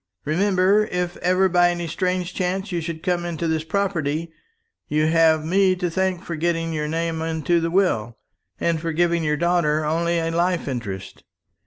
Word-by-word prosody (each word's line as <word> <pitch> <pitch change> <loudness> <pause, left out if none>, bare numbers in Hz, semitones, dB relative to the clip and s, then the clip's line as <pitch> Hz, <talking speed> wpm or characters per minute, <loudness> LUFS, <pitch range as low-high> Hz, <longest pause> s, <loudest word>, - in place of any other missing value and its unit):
"Remember, 190 +5 +3
if 180 0 -2
ever 185 +2 +2
by 175 -1 +4
any 175 -1 -2
strange 180 +2 -2
chance 190 +2 -2
you 175 -1 -1
should 160 0 -6
come 180 -2 0
into 170 -1 -3
this 160 -1 0
property, 165 -3 -1 0.6
you 155 +1 +1
have 160 -1 +3
me 190 +2 +3
to 180 -2 -2
thank 190 0 -1
for 170 - -5
getting 165 +1 -1
your 150 -1 -2
name 165 +1 -2
into 165 +1 0
the 165 - 0
will, 120 - +1 0.4
and 165 -2 0
for 165 -1 -2
giving 170 0 +1
your 150 -1 0
daughter 155 -2 +1
only 170 +2 0
a 165 0 -1
life 175 0 0
interest. 110 -8 -5
170 Hz, 175 wpm, -22 LUFS, 160-180 Hz, 0.6 s, by